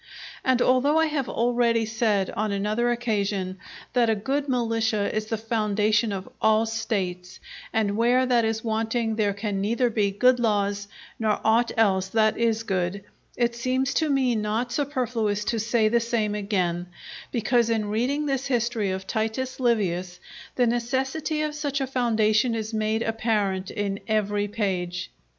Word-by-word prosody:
And 255 -1 +3
although 260 +4 +3
I 320 - +4
have 295 -5 -2
already 235 -1 +1
said 220 -3 0
on 215 0 -2
another 210 +4 0
occasion 200 -5 -1 0.3
that 240 -2 +3
a 220 - +3
good 275 +7 -2
militia 225 -4 0
is 215 0 -2
the 225 - -2
foundation 215 0 +1
of 195 -1 -5
all 220 +1 +4
States, 195 -5 -3 0.3
and 205 -2 0
where 245 +3 +3
that 245 -2 +3
is 220 0 -1
wanting 225 0 -1
there 205 -2 0
can 200 -1 -2
neither 235 +4 +1
be 210 -2 +1
good 250 +6 +3
laws, 205 -3 0 0.3
nor 215 -2 +1
aught 230 +2 +3
else 190 -4 +3
that 215 +2 +2
is 230 -1 +1
good, 190 -1 -2 0.3
it 240 -1 +1
seems 255 +3 -1
to 315 -1 +1
me 265 -3 +2
not 220 +3 -1
superfluous 235 -7 -1
to 230 0 0
say 220 0 +2
the 235 +2 +3
same 230 -3 -1
again; 185 -4 -1 0.4
because 235 0 +2
in 215 -2 0
reading 265 +7 0
this 270 -2 -1
history 235 -5 0
of 190 0 -3
Titus 225 +5 -2
Livius 185 -7 0 0.4
the 250 - +3
necessity 265 +6 -1
of 305 0 -2
such 290 -2 -2
a 270 - 0
foundation 230 -2 +2
is 220 0 -4
made 220 +1 0
apparent 210 -4 -1
in 200 -1 -3
every 205 -1 0
page. 185 -4 -2
225 Hz, 160 wpm, -25 LUFS, 205-240 Hz, 0.4 s, I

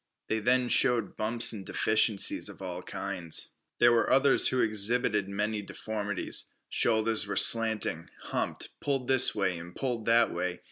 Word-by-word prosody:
They 110 - 0
then 125 +3 +1
showed 120 -4 +1
bumps 115 +2 +1
and 100 -3 -7
deficiencies 110 0 +1
of - - -12
all 90 -2 -6
kinds. 90 -4 -3 0.2
There 120 0 +5
were 115 -2 +1
others 135 +1 +4
who 130 - 0
exhibited 105 -1 0
many 105 +2 -2
deformities. 105 0 -5 0.2
Shoulders 110 -1 +1
were - - -3
slanting, 110 -7 +2
humped, - - -4
pulled 135 -3 -2
this 130 -1 +4
way 95 -4 -1
and 85 +1 -11
pulled 120 -5 -3
that 115 0 +3
way. 90 -1 -3
110 Hz, 150 wpm, -29 LUFS, 100-120 Hz, 0.2 s, There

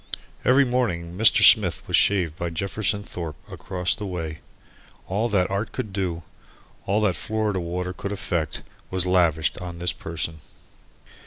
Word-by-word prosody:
Every 135 +2 +5
morning 90 -10 -1
Mr. 110 +3 +6
Smith - - +5
was - - +2
shaved 90 -6 +3
by 85 +1 -3
Jefferson 100 +4 -1
Thorpe, 85 -5 -6 0.2
across 90 -2 -1
the 105 - -5
way. 80 -4 -5 0.7
All 105 +5 0
that 95 -3 +1
art 100 +2 -2
could 110 -6 -4
do, 90 -4 -2 0.6
all 105 +3 +2
that 100 -5 +2
Florida 110 +2 -1
water 90 +1 -3
could 100 - -5
effect, 85 -6 -2 0.3
was 95 -1 0
lavished 85 -4 +2
on 85 -1 -7
his 90 -1 0
person. 80 0 -4
90 Hz, 150 wpm, -24 LUFS, 85-105 Hz, 0.7 s, Mr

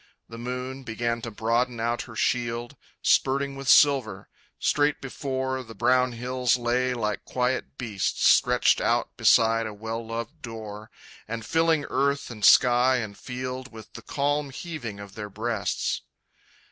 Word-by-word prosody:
The 115 0 -10
moon 125 +2 -5
Began 115 -1 -2
to 115 - -5
broaden 115 +3 0
out 120 +1 -1
her 110 - -10
shield, 120 0 -1 0.3
Spurting 140 +1 +2
with 135 -1 -7
silver. 125 -10 +4 0.3
Straight 145 0 +1
before 130 -1 -3
The 115 -2 -11
brown 125 +1 +2
hills 125 +1 0
lay 125 +1 0
like 105 -3 -2
quiet 125 +2 -2
beasts 105 -6 0
Stretched - - +4
out - - 0
beside 115 0 +4
a 105 - -7
well 115 +2 -5
loved 115 +7 -6
door, 110 -2 -8 0.4
And 115 0 -5
filling 160 +1 +2
earth 140 -1 0
and 105 -3 -9
sky 125 +3 +6
and 110 -5 -3
field 130 +2 -6
With 110 -1 -12
the - - -9
calm 145 0 -1
heaving 135 - -6
of 100 -1 -10
their 105 -1 -6
breasts. 110 +1 -2
120 Hz, 145 wpm, -26 LUFS, 115-130 Hz, 0.4 s, sky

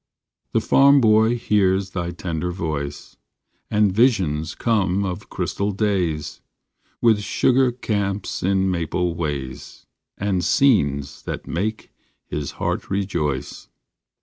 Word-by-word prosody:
The - - +3
farm 140 +1 +5
boy 110 0 +4
hears 100 -4 +1
thy 85 -2 -3
tender 85 -1 -3
voice, 75 -5 -5 0.5
And 105 -2 +3
visions 90 - +2
come 100 -4 +1
of 90 -2 -5
crystal 100 +1 -2
days, 95 -7 -1 0.6
With 115 -3 +5
sugar 130 +4 +2
camps 100 -5 -2
in 95 0 +1
maple 85 0 -1
ways, 70 -6 -5 0.3
And 100 -3 -1
scenes 70 - +2
that - - -5
make 105 +6 -3 0.3
his 75 -2 -4
heart - - -3
rejoice. 75 -9 -2
95 Hz, 110 wpm, -22 LUFS, 80-105 Hz, 0.6 s, farm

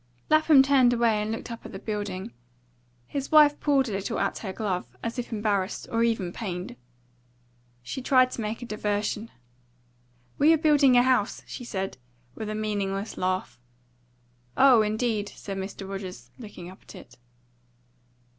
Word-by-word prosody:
Lapham 310 -3 +6
turned 265 -3 +4
away 230 -3 +2
and 210 +1 -2
looked 225 +1 -5
up 230 - -8
at - - -10
the - - -5
building. 205 - -5 0.7
His 275 - -5
wife 300 -1 +6
pulled 275 -3 +2
a - - -4
little 195 0 -3
at - - -1
her 195 - -5
glove, 190 - -3 0.2
as 235 +2 -3
if 245 - -5
embarrassed, 210 -3 -1
or 230 - +1
even 220 -7 0
pained. 180 - -5 1.1
She 195 - -5
tried 255 0 +4
to - - -5
make 220 +3 -4
a - - -5
diversion. 210 0 -2 1.1
"We 305 +3 +6
are - - +4
building 290 -5 +5
a 245 - +6
house," 255 -5 +1
she - - -8
said, 195 - -4 0.4
with 215 - -6
a 215 - -3
meaningless 205 -1 -2
laugh. 185 -9 -2 1.0
"Oh, 260 -4 +7
indeed," 215 -1 -1
said 195 -1 -7
Mr. 195 0 -6
Rogers, 195 -1 -7
looking 205 -6 -9
up 185 +1 -13
at - - -14
it. 125 0 -14
215 Hz, 160 wpm, -26 LUFS, 195-250 Hz, 1.1 s, Oh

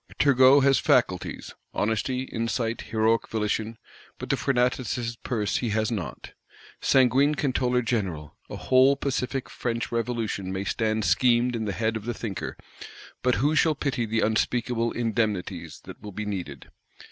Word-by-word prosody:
Turgot 135 0 +6
has 135 0 +4
faculties; - - 0 0.2
honesty, 115 +4 0
insight, 115 -1 -2
heroic 110 +1 +2
volition; 110 +1 -2 0.4
but - - -4
the - - +3
Fortunatus' 125 -2 0
Purse 110 -5 -1
he 120 - -2
has 110 +1 0
not. 100 -7 -5 0.5
Sanguine 135 +3 +4
Controller 125 -3 0
General! 95 -10 -3
a - - -6
whole 130 +2 +4
pacific 135 -1 -2
French 120 -1 -3
Revolution 115 -5 -2
may 95 +1 -3
stand 110 +1 -1
schemed 120 0 +3
in 110 -1 -2
the 100 - -1
head 110 +4 -1
of 110 -1 -5
the 120 -1 -3
thinker; 100 -7 -5 0.6
but 125 0 +2
who 145 +4 +1
shall 155 0 +3
pay 130 -5 -2
the 110 +1 0
unspeakable 115 +1 0
"indemnities" 105 -7 -2
that - - -11
will 105 - -8
be 105 +2 -5
needed? 90 -10 -6
115 Hz, 145 wpm, -26 LUFS, 110-125 Hz, 0.6 s, Turgot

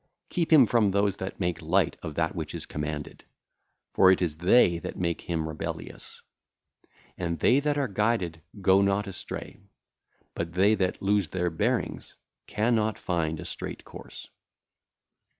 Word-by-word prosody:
Keep 170 -3 -1
him 145 -6 +8
from 115 -2 +3
those 100 0 +1
that 95 +1 -6
make 90 -3 -1
light 85 +2 +1
of - - -6
that - - 0
which - - -5
is - - -5
commanded, 75 0 -5 0.7
for 95 - +6
it 95 - +5
is 80 -4 -1
they 90 0 +4
that - - -7
make 85 -2 -1
him 80 -2 -2
rebellious. 80 0 -7 1.0
And 85 -2 -2
they 125 - +4
that 145 0 0
are 140 -2 +1
guided 100 -5 -1 0.2
go 95 0 +5
not 100 +1 +1
astray, 95 -2 -7 0.7
but 85 0 -4
they 100 +4 +4
that 95 -3 -1
lose 100 -4 +2
their 90 0 -1
bearings 80 - -2 0.3
cannot 110 -1 +1
find 80 -3 -2
a - - -7
straight - - -6
course. - - -11
95 Hz, 150 wpm, -27 LUFS, 85-105 Hz, 1.0 s, him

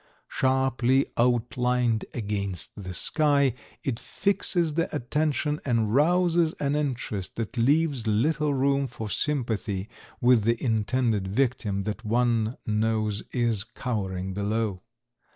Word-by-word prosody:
Sharply 130 0 +2
outlined 125 -1 +1
against 100 -5 -3
the 95 -3 -7
sky, 140 - +2 0.3
it 120 -4 -2
fixes 180 -5 0
the 165 +2 0
attention 150 +2 0
and 115 -5 +1
rouses 170 +2 +3
an 140 0 0
interest 125 -9 -3
that 115 +1 -4
leaves 140 0 +2
little 150 +8 +2
room 140 0 +1
for 110 -4 -6
sympathy 110 -8 -1 0.3
with 120 -3 +4
the 115 +2 +2
intended 110 -3 +1
victim 105 -3 0
that 105 +1 -4
one 115 0 +1
knows 110 -1 0
is 115 -5 0
cowering 95 -7 -4
below. 105 -1 -1
120 Hz, 115 wpm, -26 LUFS, 110-140 Hz, 0.3 s, with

